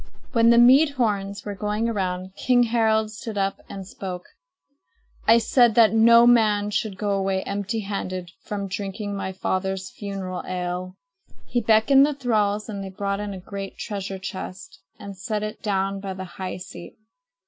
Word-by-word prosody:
When 230 -2 +4
the 235 - +6
mead 270 +5 +6
horns 200 -4 -1
were 205 - -4
going 210 +3 -1
around, 185 -4 -2
King 245 +1 +3
Harald 220 -2 +1
stood 220 0 -7
up 195 0 -1
and 195 -1 -7
spoke: 185 -2 -6 1.0
"I 225 +1 +7
said 235 0 +4
that 225 -3 +6
no 230 +1 +7
man 210 -4 +4
should 210 -2 -2
go 205 -1 -1
away 195 -1 0
empty 205 +3 -3
handed 185 -3 -4
from 200 -1 -4
drinking 200 +1 -4
my 190 -1 -3
father's 190 +2 -2
funeral 195 -5 -5
ale." 180 0 -4 0.5
He 240 - -1
beckoned 225 +5 +5
the 295 0 +1
thralls, 215 -5 0
and 200 -3 -5
they 195 - -6
brought 200 +1 -3
in 205 -1 -4
a - - -7
great 195 +1 -7
treasure 195 -2 -5
chest 185 -6 -8 0.2
and 200 -1 -9
set 210 +3 -3
it 215 0 -5
down 195 -1 -1
by 195 -1 -5
the 190 0 -6
high 185 +1 -6
seat. 180 -1 -10
200 Hz, 170 wpm, -24 LUFS, 190-220 Hz, 1.0 s, I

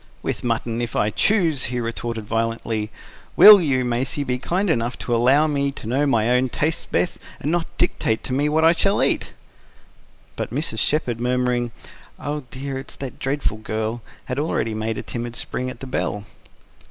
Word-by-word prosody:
"With - - -3
mutton 115 0 -1
if 120 -1 -4
I 105 - +2
choose!" 170 - +2
he 125 0 -2
retorted 115 -1 -4
violently. 115 -1 -2 0.5
"WILL 210 -2 +10
you, 135 -6 +1
Maisie, 125 +4 -1
be 125 -2 -2
kind 185 +9 0
enough 120 -7 0
to 120 - -1
allow 130 +6 +4
me 140 -2 0
to - - -10
know 135 +6 +1
my 115 -3 +2
own 125 +1 +2
tastes 155 +6 -1
best, 180 - 0 0.2
and 150 - -2
not 170 -1 0
dictate 110 -10 0
to 130 - -3
me 145 +3 +2
what 160 +2 +3
I 165 - +8
shall 195 +4 +2
eat?" - - 0 1.0
But - - -3
Mrs. 125 -4 -2
Shepherd, 125 -5 0
murmuring: 125 0 0 0.5
"Oh 145 -1 -4
dear! 135 +2 -5
it's 135 - -9
that 135 -2 -7
dreadful 135 -4 -1
girl," 110 +2 -3 0.2
had 125 +2 -3
already 130 -7 -1
made 110 +1 -2
a - - -4
timid 120 0 -5
spring 125 +1 -3
at 120 - -10
the - - -5
bell. 105 -5 -2
125 Hz, 180 wpm, -22 LUFS, 115-145 Hz, 1.0 s, WILL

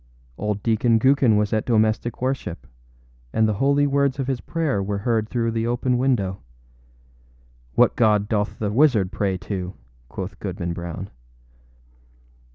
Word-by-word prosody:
Old 105 - -3
Deacon 115 0 +3
Gookin 130 -2 +4
was 105 0 0
at 110 - +1
domestic 110 +1 0
worship, 90 - -3 0.7
and 110 0 +2
the 110 - +1
holy 140 +1 +3
words 140 -1 +1
of 135 - -2
his 130 -2 -2
prayer 155 -11 -1
were 100 +1 -2
heard 110 +1 0
through 115 -2 0
the 115 0 -1
open 125 +1 0
window. 120 -7 0 1.4
âWhat - - +5
God 105 -3 +3
doth 105 -1 -1
the 105 -2 -2
wizard 110 -7 +3
pray 95 -2 -1
to?â 95 -1 -5 0.3
quoth 95 0 -6
Goodman 90 -3 -4
Brown. 85 -1 -6
110 Hz, 145 wpm, -23 LUFS, 100-125 Hz, 1.4 s, âWhat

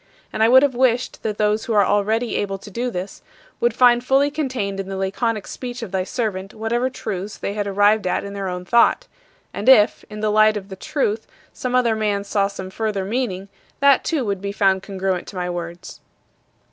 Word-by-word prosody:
And 220 - -2
I 225 - +5
would 260 +2 +7
have 280 -2 +2
wished 250 0 +1
that 210 -1 -3
those 210 +1 +1
who 230 - -2
are 205 -2 +5
already 215 +4 0
able 195 -1 -2
to 205 +2 -12
do 245 +5 -2
this 185 -3 -6 0.4
would 240 - +2
find 245 -1 +5
fully 275 +3 +3
contained 255 -10 -3
in 195 0 -5
the 195 - -4
laconic 205 +3 -1
speech 245 -1 -6
of 205 - -7
thy 190 -1 0
servant 195 -4 -3
whatever 235 +3 -1
truths 205 -5 -5
they 200 - -4
had 205 -1 -2
arrived 205 +1 +3
at - - 0
in 200 - -7
their 200 -1 -4
own 180 0 -5
thought; 235 +5 +3 0.5
and - - 0
if, 220 -5 +5
in 210 0 -8
the 215 -1 +1
light 215 0 +4
of 195 -1 -8
the 190 - -7
Truth, 225 -2 -2 0.3
some 250 0 -3
other 235 -3 +3
man 210 -2 -1
saw 200 0 +1
some 190 -2 -8
further 210 -2 -2
meaning, 200 -4 -2 0.3
that 280 -1 +5
too 300 -7 -1
would 200 -2 -2
be 200 0 -3
found 195 -2 +2
congruent 190 -2 -3
to - - -10
my 180 -1 -2
words. 175 +1 -7
210 Hz, 210 wpm, -21 LUFS, 195-240 Hz, 0.5 s, would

